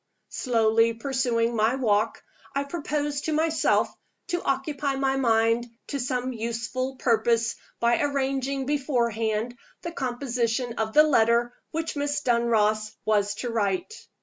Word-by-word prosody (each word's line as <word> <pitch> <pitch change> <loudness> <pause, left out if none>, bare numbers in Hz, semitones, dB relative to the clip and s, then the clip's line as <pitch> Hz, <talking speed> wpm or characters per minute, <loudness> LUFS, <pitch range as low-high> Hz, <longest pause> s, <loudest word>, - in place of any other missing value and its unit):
Slowly 230 -2 +2
pursuing 240 -2 0
my 220 +3 +2
walk, 215 -5 +1 0.3
I 280 - +1
proposed 290 -1 -3
to 315 - 0
myself 320 +1 +2 0.4
to 350 -1 -1
occupy 275 +1 -1
my 270 0 +1
mind 230 -2 +2 0.2
to 280 - -2
some 250 0 -2
useful 240 +3 -3
purpose 230 -1 +2 0.3
by 235 0 +2
arranging 275 -1 -1
beforehand 235 -5 -1 0.2
the 340 - -4
composition 245 -3 -1
of 220 0 -1
the 305 - +8
letter 235 -4 +3 0.2
which 325 0 -3
Miss 290 0 -1
Dunross 220 -3 +1
was 205 -1 +2
to 240 - -2
write. 205 - -1
245 Hz, 125 wpm, -26 LUFS, 230-275 Hz, 0.4 s, the